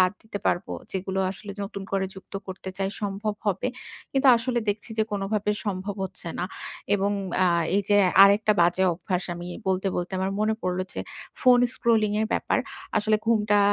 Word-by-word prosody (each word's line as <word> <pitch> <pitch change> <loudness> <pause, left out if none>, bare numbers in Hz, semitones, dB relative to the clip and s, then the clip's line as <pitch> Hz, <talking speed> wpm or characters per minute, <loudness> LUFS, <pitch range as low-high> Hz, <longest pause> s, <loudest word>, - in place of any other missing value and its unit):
বাদ 185 +1 +4
দিতে 220 -2 -6
পারবো। 175 +3 0 0.2
যেগুলো 190 0 -2
আসলে 200 +1 -8
নতুন 195 0 -6
করে 190 -1 +1
যুক্ত 190 +1 -14
করতে 190 0 -7
চাই 195 - 0
সম্ভব 205 +1 -2
হবে। 205 +5 +1 0.4
কিন্তু 270 0 +2
আসলে 240 +1 -1
দেখছি 205 +2 -2
যে, - - +5
কোনভাবে 205 +1 0 0.2
সম্ভব 195 +1 -2
হচ্ছে 180 -2 -7
না। 175 - 0 0.5
এবং 200 0 +1 0.3
অ্যা 185 -1 +4 0.3
এইযে 205 0 +2 0.3
আরেকটা 205 +2 +4
বাজে 175 +2 +3
অভ্যাস 180 +2 -2
আমি 175 +1 -7 0.2
বলতে, 190 +1 +1
বলতে 175 +2 -3
আমার 190 +1 -1
মনে 220 +1 +2
পড়লো 180 0 0
যে, - - -3 0.4
ফোন 250 -1 +6 0.2
স্ক্রলিং 220 -3 +2
এর 220 - +1
ব্যাপার। - - +1 0.4
আসলে 215 +1 +2
ঘুমটা 210 -2 +3
200 Hz, 170 wpm, -26 LUFS, 190-215 Hz, 0.5 s, ফোন